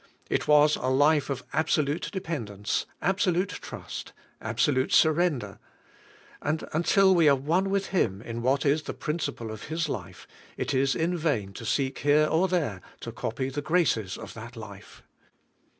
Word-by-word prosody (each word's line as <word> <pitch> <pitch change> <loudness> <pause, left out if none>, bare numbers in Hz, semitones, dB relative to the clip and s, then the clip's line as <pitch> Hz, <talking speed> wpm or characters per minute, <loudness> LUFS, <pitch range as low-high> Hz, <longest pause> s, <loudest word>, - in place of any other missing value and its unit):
It - - 0
was 150 0 +5
a 130 - -3
life 145 +3 +3
of 135 -2 -3
absolute 155 -1 0
dependence, 115 - -3 0.2
absolute 185 -1 +1
trust, - - -7 0.3
abso 115 +6 +1
lute 130 +1 0
surrender, 155 - +2 0.8
and 155 +2 -1
until 190 +4 +4
we 165 -4 +5
are 140 - +6
one 165 +8 0
with 195 0 0
Him 105 - +1
in 115 0 -5
Vv^hat 135 +5 +1
is 145 +2 +3
the - - -6
principle 145 -8 -3
of 110 -1 -8
His 160 +1 -2
life, 95 - -6 0.3
it - - -2
is 135 +1 +2
in 170 +2 0
vain 135 - -1
to 115 - -7
seek 135 +1 0
here 145 +1 +4
or 165 +4 +2
there 150 - -1 0.2
to - - -6
copy 130 +4 -3
the 140 +2 -4
graces 145 - +1
of - - -9
that 120 +2 -9
life. 100 -3 -11
145 Hz, 165 wpm, -27 LUFS, 120-165 Hz, 0.8 s, are